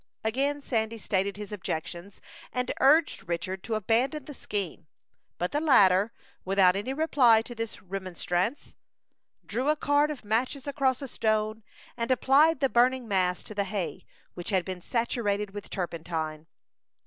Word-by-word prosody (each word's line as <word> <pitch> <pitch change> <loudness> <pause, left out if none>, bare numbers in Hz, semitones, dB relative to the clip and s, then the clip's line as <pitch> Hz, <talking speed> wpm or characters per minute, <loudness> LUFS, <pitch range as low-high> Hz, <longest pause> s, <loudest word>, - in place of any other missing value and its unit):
Again 275 +6 0
Sandy 225 -3 -1
stated 200 -1 -1
his 210 -1 -7
objections, 175 0 -5 0.3
and 250 -1 -1
urged 295 - +3
Richard 185 +2 -3
to 225 - -1
abandon 245 +7 0
the 295 - -8
scheme; 190 - -5 0.5
but 180 - -2
the 295 - 0
latter, 205 -8 +5 0.3
without 190 -1 +4
any 205 +6 -2
reply 265 -7 +4
to 240 - -7
this 225 -3 -6
remonstrance, 185 - -3 0.7
drew 250 +7 -1
a 305 - +4
card 290 0 +2
of 290 -7 -6
matches 250 +6 -1
across 275 -2 0
a - - -4
stone, 215 -1 0 0.3
and 230 0 -3
applied 275 +4 +4
the 270 - +4
burning 250 0 +3
mass 185 -3 +1
to - - -8
the 200 -1 -1
hay 185 -6 -4 0.3
which 175 - -6
had 190 -3 +1
been 185 -2 -5
saturated 210 -3 -1
with 205 +1 -8
turpentine. 165 -3 -4
215 Hz, 150 wpm, -28 LUFS, 190-260 Hz, 0.7 s, latter